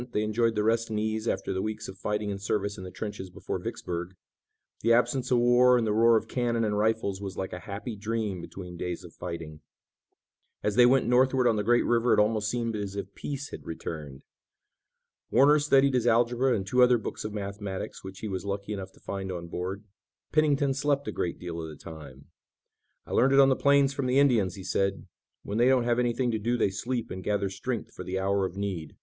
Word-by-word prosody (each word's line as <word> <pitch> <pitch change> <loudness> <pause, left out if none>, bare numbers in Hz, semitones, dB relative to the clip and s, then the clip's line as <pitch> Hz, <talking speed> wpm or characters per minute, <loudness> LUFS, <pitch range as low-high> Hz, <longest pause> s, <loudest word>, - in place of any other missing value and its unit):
They 105 - +1
enjoyed 115 +1 +1
the 105 - +1
rest 115 +1 +1
and 110 -1 -1
ease 110 +1 -2
after 95 - -1
the 95 - -1
weeks 110 0 -4
of 95 - -8
fighting 105 +1 -2
and 100 0 -5
service 100 0 -1
in 95 - -9
the 90 - -7
trenches 100 -2 -6
before 90 - -5
Vicksburg. 85 +1 -5 0.7
The 115 +1 +4
absence 125 +2 +2
of 125 - +4
war 120 +1 +5
and 115 - +1
the 105 - +1
roar 115 +1 +5
of - - -3
cannon 120 -2 0
and 105 -1 0
rifles 105 -2 0
was 100 -2 -6
like 95 - -4
a 90 - -5
happy 100 +3 -5
dream 105 -3 -3
between 90 0 -9
days 90 0 -4
of 85 - -12
fighting. 80 -3 -7 1.0
As 105 -1 0
they 120 0 +7
went 130 +1 +4
northward 130 +1 +4
on 115 - +3
the 105 - 0
great 120 +3 +3
river 120 0 +3
it - - +2
almost 105 0 +2
seemed 115 -1 -2
as 100 -1 -4
if 100 -1 -5
peace 140 -1 -6
had - - -8
returned. 75 -4 -7 1.1
Warner 145 +3 +5
studied 140 -2 +4
his 125 -2 +1
algebra 120 +2 +3
and 95 -3 -3
two 125 +6 +2
other 125 0 +6
books 110 - -6
of 105 - -4
mathematics 100 -1 -5
which 95 0 -9
he 110 - -3
was 95 -3 -4
lucky 100 +1 -3
enough 95 -2 -6
to - - -21
find 95 -1 -5
on 85 -2 -6
board. 95 +4 -4 0.5
Pennington 145 -3 +3
slept 140 +1 0
a - - -1
great 85 - -3
deal 85 -2 -5
of 80 - -6
the 75 - -9
time. 70 -3 -11 0.8
"I - - -12
learned 135 +2 +4
it 135 - +6
on 135 0 +7
the 130 - +3
plains 140 0 +4
from 135 -1 -2
the 125 +1 +2
Indians," 115 -10 +3
he 95 - -9
said. 95 +1 -1 0.4
"When 105 +3 -3
they 120 - +5
don't 130 -2 +4
have 120 0 +1
anything 120 0 +1
to 110 - -1
do 120 +3 0
they 100 - +2
sleep 115 +4 -3
and 95 0 -6
gather 100 -1 0
strength 120 +3 -4
for - - -7
the 90 +1 -3
hour 100 0 +1
of 95 - -11
need. 95 -6 -4
105 Hz, 225 wpm, -28 LUFS, 95-120 Hz, 1.1 s, they